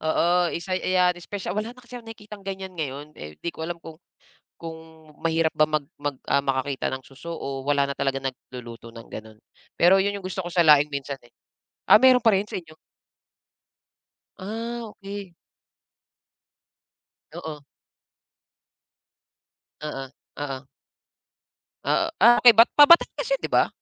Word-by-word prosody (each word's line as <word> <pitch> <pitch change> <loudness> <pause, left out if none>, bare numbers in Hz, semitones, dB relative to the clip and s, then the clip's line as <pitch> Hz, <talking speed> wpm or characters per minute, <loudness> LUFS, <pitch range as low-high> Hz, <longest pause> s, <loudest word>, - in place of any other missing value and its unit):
oo, 160 +1 +1 0.3
isa 170 +3 -4
ayan 185 -1 +2
espesyal 180 +2 -6
wala 215 +5 -4
na - - -14
kasi 245 +1 -9
akong 230 - -15
nakikitang 210 -2 -11
ganyan 190 -1 -6
ngayon, 150 -3 -6
eh, 75 - -10
di 170 - -4
ko - - -12
alam 175 - -4
kung 165 -1 -13 0.6
kung 165 -1 -7 0.5
mahirap 165 -1 +1
ba 155 - +5
mag 155 -1 -1 0.2
mag, 145 -1 -3
ah, 140 - +3
makakita 135 0 -1
ng 130 - -4
suso 155 +5 -9
o 135 -4 -5
wala 140 -1 +2
na 140 - -4
talaga 135 -1 -1
nagluluto 125 -3 -8
ng 115 0 -12
ganun, 110 0 -10 0.4
pero 175 +3 +7
yun 200 +1 0
gusto 185 0 -5
ko 175 - -6
sa 175 - +2
laing 150 -1 +6
minsan, 140 0 -4
eh. 120 - -21 0.6
Ah, - - +10
meron 255 -1 +6
pa 225 - +6
rin 195 - 0
sa - - -5
inyo? 155 -2 -17 1.6
Ah, 230 +5 -5
okey. 200 -4 -9 2.0
Oo. 155 -4 -8 2.2
Oo, 150 -3 -5 0.4
oo. 135 -2 -5 1.2
Ah, - - +1
ah, 240 +1 +8
okey, 240 - +9
pa 235 +6 +7
Batangas 340 +7 +5
yun - - +1
'di - - -3
ba? - - +4
165 Hz, 150 wpm, -24 LUFS, 140-200 Hz, 2.2 s, Ah